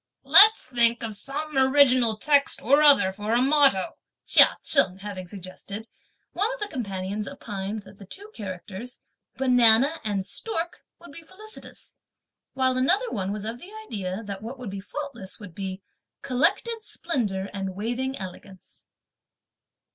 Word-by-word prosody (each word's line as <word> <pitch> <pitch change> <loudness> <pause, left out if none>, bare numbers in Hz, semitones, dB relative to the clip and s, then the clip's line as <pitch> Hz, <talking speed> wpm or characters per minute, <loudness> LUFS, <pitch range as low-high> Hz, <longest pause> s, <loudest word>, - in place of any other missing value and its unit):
"Let's 435 +2 +7
think 235 -2 +1
of 225 -1 -3
some 285 +8 -6
original 265 -4 +4
text 285 +3 +2
or 280 +5 +4
other 285 -10 +6
for 210 +3 -4
a - - +4
motto," 270 -7 +2 0.3
Chia - - +6
Cheng 190 -11 +3
having 195 -2 -7
suggested, 200 +3 -9 0.5
one 410 +6 0
of - - -15
the 415 - -3
companions 200 - -4
opined 205 -5 -6
that 195 - -17
the 200 - -11
two 410 - -11
characters: 200 +4 -8 0.4
"Banana 250 +3 +4
and 200 -3 -2
stork" 345 - -5 0.2
would 345 - -14
be 335 - -11
felicitous; 410 +6 -12 0.6
while 260 -1 +1
another 380 - +1
one 195 -2 -3
was 210 0 -5
of 230 +2 -5
the 360 - -12 0.2
idea 195 - -5
that 200 -2 -7
what 235 +5 -8
would 245 -6 -7
be 195 0 -6
faultless 235 -4 -7
would 205 -5 -11
be: 190 +1 -6 0.4
"Collected 345 - 0
splendour 210 - -3
and 195 -2 -5
waving 245 +6 -3
elegance!" 190 0 -11
235 Hz, 145 wpm, -25 LUFS, 195-280 Hz, 0.6 s, Let's